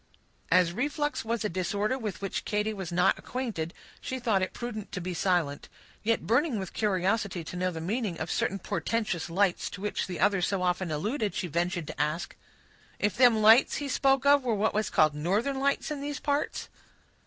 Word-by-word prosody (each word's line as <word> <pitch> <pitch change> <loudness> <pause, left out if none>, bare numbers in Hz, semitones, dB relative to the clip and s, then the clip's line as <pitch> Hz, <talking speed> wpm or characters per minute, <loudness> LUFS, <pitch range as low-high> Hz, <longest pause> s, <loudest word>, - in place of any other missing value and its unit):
As 180 -1 +4
reflux 295 - -1
was 230 0 -2
a - - +3
disorder 200 +6 -1
with 215 -8 -5
which 195 - -2
Katy 210 0 -1
was 190 -4 -6
not 180 +1 +3
acquainted, 225 -11 -4 0.3
she 260 - -4
thought 225 -6 +1
it 185 - -1
prudent 220 -4 -6
to - - -2
be 180 +1 -4
silent; 170 -5 0 0.3
yet 230 +1 0
burning 245 +2 +2
with 190 -2 -5
curiosity 195 -2 0
to 165 - -8
know 185 +1 0
the 165 -3 -6
meaning 200 0 -2
of 160 - -3
certain 195 - 0
portentous 200 -2 -2
lights 185 +1 +1
to 190 - -9
which 210 0 -2
the 180 -3 -5
other 195 -1 +3
so 185 +1 0
often 180 0 0
alluded, 210 - -1
she - - -1
ventured 175 +1 -1
to 145 - -4
ask,— 155 +3 -2 0.6
"If 205 -2 0
them 235 -3 +5
lights 225 +4 +7
he 290 - -3
spoke 270 0 +2
of 285 -1 +6
were 235 -3 +1
what 210 +2 +1
was 215 -1 0
called 155 -5 +4
northern 205 - 0
lights 280 +2 0
in 290 -2 -3
these 290 0 -4
parts?" 285 0 -1
205 Hz, 195 wpm, -28 LUFS, 180-235 Hz, 0.6 s, lights